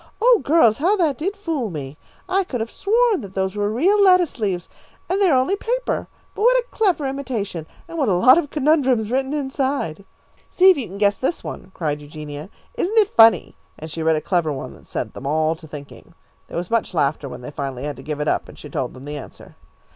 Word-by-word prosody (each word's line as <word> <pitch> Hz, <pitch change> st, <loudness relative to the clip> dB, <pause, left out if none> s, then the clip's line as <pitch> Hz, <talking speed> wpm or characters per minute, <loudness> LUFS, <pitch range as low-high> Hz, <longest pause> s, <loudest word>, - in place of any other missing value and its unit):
"Oh, 475 Hz, 0 st, +5 dB
girls, 275 Hz, -8 st, +4 dB
how 365 Hz, +8 st, +3 dB
that 320 Hz, -, 0 dB
did 390 Hz, +6 st, -2 dB
fool 320 Hz, -, -2 dB
me. 145 Hz, -4 st, -6 dB, 0.3 s
I 380 Hz, +2 st, +2 dB
could 260 Hz, -9 st, -4 dB
have 225 Hz, +1 st, -4 dB
sworn 450 Hz, -, +2 dB
that 195 Hz, -3 st, -10 dB
those 190 Hz, 0 st, -1 dB
were 205 Hz, 0 st, 0 dB
real 370 Hz, -, +3 dB
lettuce 365 Hz, -7 st, +4 dB
leaves, 190 Hz, -5 st, -2 dB, 0.4 s
and 390 Hz, +2 st, 0 dB
they 385 Hz, -, +5 dB
are 270 Hz, -, +4 dB
only 260 Hz, +10 st, +2 dB
paper. -, -, -2 dB, 0.3 s
But -, -, -7 dB
what -, -, +5 dB
a -, -, 0 dB
clever 375 Hz, -9 st, +1 dB
imitation, 235 Hz, -, -4 dB, 0.2 s
and 335 Hz, -1 st, -6 dB
what 270 Hz, -7 st, +2 dB
a -, -, +3 dB
lot 250 Hz, -, +6 dB
of 290 Hz, -, -4 dB
conundrums 265 Hz, -7 st, +2 dB
written 265 Hz, +1 st, 0 dB
inside!" 270 Hz, -, -2 dB, 0.5 s
"See 375 Hz, +1 st, +6 dB
if 365 Hz, -, +1 dB
you 260 Hz, -, -3 dB
can 195 Hz, -, -9 dB
guess 200 Hz, -1 st, +2 dB
this 295 Hz, +6 st, -1 dB
one?" 185 Hz, -, -7 dB
cried 150 Hz, -3 st, -2 dB
Eugenia. 150 Hz, +2 st, -8 dB, 0.2 s
"Isn't 450 Hz, -2 st, -2 dB
it 425 Hz, -3 st, +4 dB
funny?" 225 Hz, 0 st, +6 dB, 0.2 s
and 160 Hz, +1 st, -8 dB
she 165 Hz, -, -4 dB
read 160 Hz, 0 st, +3 dB
a 155 Hz, -, -1 dB
clever 170 Hz, -2 st, 0 dB
one 130 Hz, -, -6 dB
that -, -, -18 dB
set -, -, -4 dB
them 135 Hz, -, -7 dB
all 155 Hz, +2 st, +1 dB
to 160 Hz, 0 st, -14 dB
thinking. 145 Hz, -1 st, -11 dB, 0.3 s
There -, -, -6 dB
was 175 Hz, +3 st, -4 dB
much 230 Hz, -5 st, 0 dB
laughter 145 Hz, -2 st, 0 dB
when -, -, -9 dB
they 125 Hz, -, -8 dB
finally 135 Hz, -3 st, -5 dB
had 145 Hz, -1 st, -4 dB
to -, -, -9 dB
give 150 Hz, +1 st, -5 dB
it 150 Hz, -, -2 dB
up, -, -, 0 dB
and -, -, -13 dB
she 150 Hz, -, -10 dB
told 130 Hz, -2 st, -3 dB
them 130 Hz, -, -11 dB
the 145 Hz, +1 st, -6 dB
answer. -, -, -13 dB
230 Hz, 230 wpm, -21 LUFS, -, 0.5 s, lot